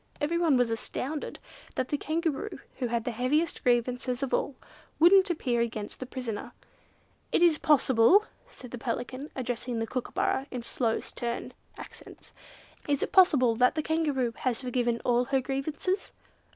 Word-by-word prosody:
Everyone 325 -1 +2
was 245 -2 +2
astounded 270 +6 -3 0.4
that 255 - -1
the - - +1
Kangaroo, 325 +3 -2 0.2
who 250 - 0
had 235 -1 -1
the 245 - -2
heaviest 275 +8 0
grievances 250 +1 0
of 270 - -3
all, 280 - 0 0.4
wouldn't 375 +4 +6
appear 250 -8 0
against 220 -3 -4
the 260 - -6
prisoner. 245 -5 -5 0.8
"Is 340 -3 +4
it - - -26
possible," 290 - +5 0.2
said 250 - -12
the 245 - -6
Pelican, 250 +5 -4
addressing 245 -1 -3
the 225 - -1
Kookooburra 275 - -2
in 245 -2 -5
slow 230 -1 -1
stern 235 0 -5 0.2
accents, - - -12 0.5
"Is 285 -1 +1
it - - -3
possible 285 -11 +5
that 250 +3 +4
the 310 - -1
Kangaroo 295 -7 0
has 250 -2 -1
forgiven 245 -2 0
all 245 0 +3
her 270 +1 +1
grievances?" 280 +8 -2
255 Hz, 150 wpm, -28 LUFS, 240-305 Hz, 0.8 s, wouldn't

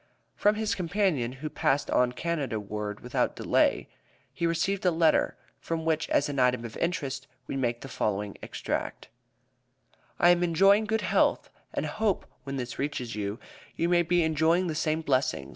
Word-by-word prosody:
From 210 +1 +3
his 215 -1 0
companion, 180 - 0
who 135 +4 -6
passed 140 +2 0
on 125 0 +3
Canada 140 -6 -2
ward 105 0 -5
without 125 - -1
delay, - - +2 0.5
we 170 - +2
received 170 +4 0
a 180 - +4
letter, 165 -2 +2 0.2
from 165 -1 -3
which, 160 -1 0
as 140 - +2
an 140 -2 -3
item 125 -2 +2
of 115 - -8
interest, 140 -6 -2 0.2
we - - -5
make 120 -3 -1
the - - -7
following 105 -5 -2
extract: - - -4 1.1
"I 175 - +5
am 175 0 +3
enjoying 195 +5 +4
good 220 +1 0
health, - - +1 0.2
and - - -2
hope 215 -3 -1 0.2
when 140 0 -4
this 125 -2 -5
reaches 130 -4 -3
you, 105 0 -3 0.4
you 170 - 0
may 175 -1 +4
be 175 0 +2
enjoying 160 +3 +2
the 165 - -2
same 155 0 0
blessing. 130 - 0
155 Hz, 170 wpm, -28 LUFS, 125-175 Hz, 1.1 s, I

